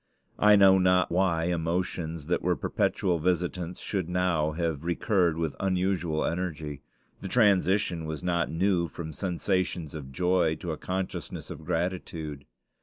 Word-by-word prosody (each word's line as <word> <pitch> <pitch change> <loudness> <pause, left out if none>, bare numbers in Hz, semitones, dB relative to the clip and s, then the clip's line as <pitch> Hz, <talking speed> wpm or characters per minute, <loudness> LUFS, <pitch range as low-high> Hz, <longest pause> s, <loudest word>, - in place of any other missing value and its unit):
I 105 0 +7
know 95 -1 +7
not 90 0 +3
why 85 -2 +2
emotions 85 -2 -2
that 85 - 0
were 90 0 +1
perpetual 90 0 0
visitants 90 +1 -1
should 95 -5 -3
now 90 -4 +1
have 80 -3 -2
recurred 85 -1 +1
with 80 -3 -2
unusual 90 -4 0
energy. 80 -5 -3 0.4
The 100 - -4
transition 95 -5 +2
was 80 +1 -5
not 85 -2 0
new 90 0 +1
from 80 -1 -7
sensations 90 -3 -1
of 70 -4 -7
joy 90 +1 +2
to 85 -1 -5
a 80 - -4
consciousness 95 0 -4
of - - -8
gratitude. 80 -4 -3
85 Hz, 140 wpm, -28 LUFS, 80-95 Hz, 0.4 s, I